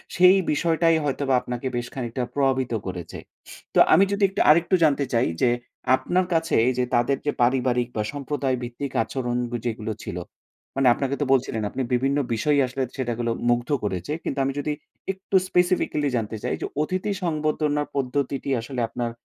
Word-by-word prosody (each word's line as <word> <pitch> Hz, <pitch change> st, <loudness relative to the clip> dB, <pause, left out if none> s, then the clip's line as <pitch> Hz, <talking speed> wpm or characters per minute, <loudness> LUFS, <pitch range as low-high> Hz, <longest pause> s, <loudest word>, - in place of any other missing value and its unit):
সেই 180 Hz, +2 st, +7 dB
বিষয়টাই 165 Hz, +1 st, +2 dB
হয়তোবা 140 Hz, -1 st, 0 dB
আপনাকে 125 Hz, +2 st, -4 dB
বেশ 120 Hz, 0 st, -2 dB
খানিকটা 125 Hz, -1 st, -3 dB
প্রভাবিত 130 Hz, -3 st, +1 dB
করেছে। 90 Hz, -2 st, -6 dB, 0.6 s
তো -, -, +5 dB
আমি 195 Hz, -, +7 dB
যদি 200 Hz, 0 st, 0 dB
একটু 195 Hz, -, -1 dB
আরেকটু 170 Hz, +4 st, +5 dB
জানতে 145 Hz, -2 st, +3 dB
চাই 115 Hz, +1 st, +3 dB
যে, 125 Hz, -, +5 dB, 0.5 s
আপনার 180 Hz, +6 st, 0 dB
কাছে 165 Hz, 0 st, 0 dB
এইযে 125 Hz, 0 st, +1 dB
তাদের 120 Hz, +3 st, +2 dB
যে 145 Hz, -, +2 dB
পারিবারিক 125 Hz, -1 st, +2 dB
বা 105 Hz, -, 0 dB
সম্প্রদায় 140 Hz, -2 st, -2 dB
ভিত্তিক 120 Hz, +3 st, -5 dB
আচরণ 120 Hz, 0 st, -3 dB, 0.3 s
যেগুলো 110 Hz, -1 st, -2 dB
ছিল। 90 Hz, -, -5 dB, 0.6 s
মানে 135 Hz, -1 st, +3 dB
আপনাকে 135 Hz, +1 st, -2 dB
তো -, -, +2 dB
বলছিলেন। 120 Hz, -4 st, 0 dB
আপনি 135 Hz, -, -4 dB
বিভিন্ন 135 Hz, +3 st, +2 dB, 0.2 s
বিষয় 145 Hz, +6 st, +2 dB
আসলে 130 Hz, +1 st, -2 dB
সেটা 125 Hz, -3 st, -1 dB
গুলো 120 Hz, -1 st, 0 dB, 0.2 s
মুগ্ধ 120 Hz, 0 st, +1 dB
করেছে। 95 Hz, -, -3 dB
কিন্তু -, -, -3 dB
আমি 135 Hz, -, -1 dB
যদি 150 Hz, -, -2 dB, 0.4 s
একটু 190 Hz, +1 st, -5 dB
স্পেসিফিকালি 180 Hz, -5 st, +1 dB
জানতে 110 Hz, -1 st, -3 dB
চাই -, -, -1 dB
যে, -, -, -1 dB, 0.2 s
অতিথি 185 Hz, +6 st, -1 dB
সংবর্ধনার 150 Hz, -2 st, 0 dB
পদ্ধতিটি 140 Hz, +1 st, -1 dB
আসলে 125 Hz, +1 st, -4 dB
আপনার 120 Hz, 0 st, -3 dB
135 Hz, 165 wpm, -24 LUFS, 120-150 Hz, 0.6 s, সেই